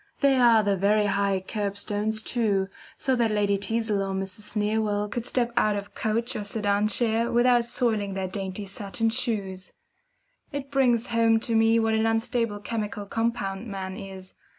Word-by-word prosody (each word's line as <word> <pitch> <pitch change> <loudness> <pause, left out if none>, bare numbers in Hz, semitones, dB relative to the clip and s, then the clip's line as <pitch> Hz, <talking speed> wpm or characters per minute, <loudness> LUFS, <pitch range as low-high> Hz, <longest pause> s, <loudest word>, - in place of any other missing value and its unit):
There 270 -3 +4
are 230 -2 +6
the 200 -1 +2
very 205 +3 +2
high 200 -1 +1
curbstones 210 +1 -2
too, 205 -6 0 0.3
so 265 -1 +1
that 235 -2 +2
Lady 205 -2 +1
Teazle 220 -1 0
or 195 0 -2
Mrs. 195 +2 -3
Sneerwell 210 -1 0
could 240 +1 -3
step 240 -2 +1
out 215 -3 +3
of 200 0 -6
coach 230 +3 -1
or 210 - -3
sedan 205 0 +1
chair 225 +1 +1
without 240 0 +4
soiling 220 -5 0
her 190 -1 -2
dainty 190 +1 -5
satin 205 +3 -2
shoes. 200 -6 -2 0.8
It 280 -1 -5
brings 250 -3 +2
home 230 -1 +4
to 230 - -2
me 225 0 +4
what 225 -1 +2
an 220 0 +2
unstable 225 -1 0
chemical 210 -2 -4
compound 225 -1 -2
man 190 -2 -5
is. 190 -1 -9
215 Hz, 165 wpm, -26 LUFS, 200-230 Hz, 0.8 s, are